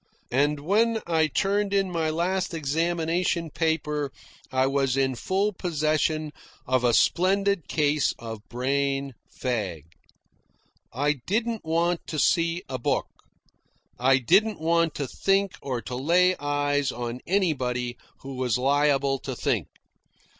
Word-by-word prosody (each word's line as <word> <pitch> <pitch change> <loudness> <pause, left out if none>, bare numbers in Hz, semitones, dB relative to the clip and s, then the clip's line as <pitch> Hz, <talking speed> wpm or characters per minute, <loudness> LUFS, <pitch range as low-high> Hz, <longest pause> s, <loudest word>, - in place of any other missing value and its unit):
And 145 +3 +1
when 220 +7 +2
I 160 -2 +2
turned 200 +6 0
in 195 -2 +1
my 165 -2 0
last 175 +3 -1
examination 165 +2 0
paper 150 -3 -1 0.4
I 130 0 +2
was 135 -1 +1
in 135 -1 +2
full 195 - 0
possession 155 -3 0 0.3
of 130 -1 +1
a 120 - +4
splendid 195 0 +2
case 150 -2 +2
of 115 -2 -7
brain 135 +2 -1 0.2
fag. 100 - -3 1.1
I 145 +4 +1
didn't 225 +2 -1
want 170 +2 0
to 155 - -4
see 165 +3 +2
a 130 -1 -4
book. - - 0 0.9
I 130 +2 +5
didn't 195 - +3
want 165 0 +1
to 140 - -3
think 195 +6 +1
or 125 -4 -3
to 125 - -7
lay 180 +7 +3
eyes 145 -1 0
on 120 0 -5
anybody 130 -10 0 0.3
who 135 0 -7
was 125 -3 +1
liable 140 0 +2
to - - -5
think. - - -1
150 Hz, 130 wpm, -26 LUFS, 135-175 Hz, 1.1 s, I